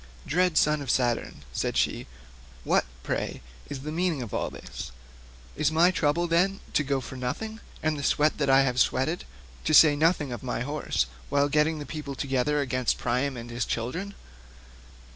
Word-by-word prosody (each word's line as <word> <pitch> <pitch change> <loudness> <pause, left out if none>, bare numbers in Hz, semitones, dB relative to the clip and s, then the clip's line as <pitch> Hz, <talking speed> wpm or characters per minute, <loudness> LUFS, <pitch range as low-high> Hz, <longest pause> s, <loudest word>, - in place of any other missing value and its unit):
"Dread 180 +1 +2
son 150 0 +3
of 135 - -6
Saturn," 120 -1 0
said - - -1
she, - - 0 0.6
"what, - - +2 0.2
pray, - - -3 0.3
is 135 - -5
the 150 +2 -5
meaning 165 -4 0
of 110 - -8
all - - -1
this? - - -8 0.6
Is 155 0 +1
my 170 +3 +5
trouble, 170 -1 +1
then, 180 +4 +2
to 150 - +3
go 140 -1 0
for 130 - -8
nothing, 220 - -4 0.2
and 155 -1 0
the - - -4
sweat 150 +2 +2
that 140 -2 +1
I 135 0 +7
have 125 -1 0
sweated, 145 +9 +1 0.4
to 155 - +3
say 150 -2 +8
nothing 155 -2 +2
of 120 - -5
my 125 -2 -3
horses, 145 - -1 0.2
while 145 0 +2
getting 150 +2 +2
the 145 - -6
people 145 -3 -6
together 135 +2 0
against 130 -2 0
Priam 125 +2 -1
and 120 0 -7
his 120 +1 -1
children? 170 - -3
145 Hz, 180 wpm, -27 LUFS, 130-160 Hz, 0.6 s, say